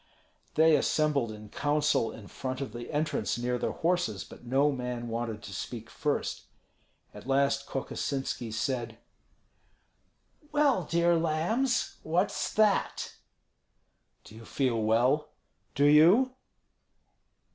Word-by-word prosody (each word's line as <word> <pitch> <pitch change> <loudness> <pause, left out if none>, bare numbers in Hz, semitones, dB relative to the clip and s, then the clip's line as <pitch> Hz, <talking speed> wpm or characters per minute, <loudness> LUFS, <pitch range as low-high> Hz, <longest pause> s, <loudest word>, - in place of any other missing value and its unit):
They 160 0 +6
assembled 145 -5 +1
in 105 0 -10
counsel 145 -5 +1
in 105 -3 -11
front 130 +4 -5
of 135 -6 -5
the 120 0 -7
entrance 155 -3 -1
near 125 +1 -1
their - - -1
horses, 165 - 0
but - - -14
no 135 +4 +2
man 125 -2 -4
wanted 115 -1 -4
to 100 - -8
speak 115 +4 -6
first. 145 -1 -2 0.7
At - - -11
last 140 +1 +1
Kokosinski 135 -3 -3
said, 115 -1 -2 1.5
"Well, 285 - +2
dear 170 +2 +2
lambs, 170 +11 0
what's 175 +5 0
that?" 215 -2 +1 1.1
"Do - - -15
you 115 +1 -11
feel 120 -1 0
well?" 125 +7 +2 0.5
"Do 145 - +3
you?" 175 - +6
140 Hz, 115 wpm, -29 LUFS, 120-160 Hz, 1.5 s, They